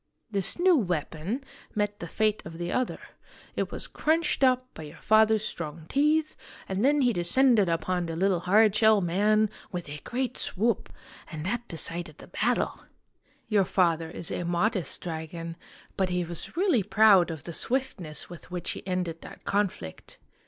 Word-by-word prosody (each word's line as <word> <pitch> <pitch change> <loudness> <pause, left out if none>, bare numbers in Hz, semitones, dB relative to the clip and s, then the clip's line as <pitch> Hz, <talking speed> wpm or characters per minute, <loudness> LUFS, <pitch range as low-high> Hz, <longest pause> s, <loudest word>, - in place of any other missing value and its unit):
"This 195 -3 +2
new 360 0 +5
weapon 180 - -2 0.3
met 205 -1 -1
the 170 - -6
fate 215 +4 0
of 165 +1 -9
the 175 0 -3
other. 255 -1 -1 0.6
It - - -1
was - - -5
crunched 320 -2 0
up 255 -1 +2
by - - -9
your 150 -1 -10
father's 220 0 +4
strong 160 -3 -6
teeth, 305 +2 +2 0.3
and 190 +2 -1
then 290 +2 +4
he 245 -2 +3
descended 210 +3 +3
upon 175 +1 -1
the 165 - -4
little 185 +1 +2
hard 205 +4 +4
shell 220 -1 +5
man 205 +4 +2 0.2
with 175 -3 -5
a 150 +1 -7
great 250 0 -2
swoop 225 +2 -1 0.4
and 155 -1 -6
that 240 +4 -2
decided 165 -1 -2
the - - -12
battle! 240 +7 0 0.7
Your 210 -3 +3
father 170 -3 +1
is 170 0 -5
a - - -2
modest 175 +2 0
dragon, 165 0 -5 0.4
but 190 -1 +1
he 180 0 0
was 170 - -3
really 355 - +3
proud 205 -2 +5
of 160 -3 -6
the 170 - -7
swiftness 190 - -1
with 175 -1 -12
which 180 -1 -3
he - - -6
ended 180 -3 -2
that - - -12
conflict. 200 - -2
190 Hz, 165 wpm, -27 LUFS, 170-225 Hz, 0.7 s, new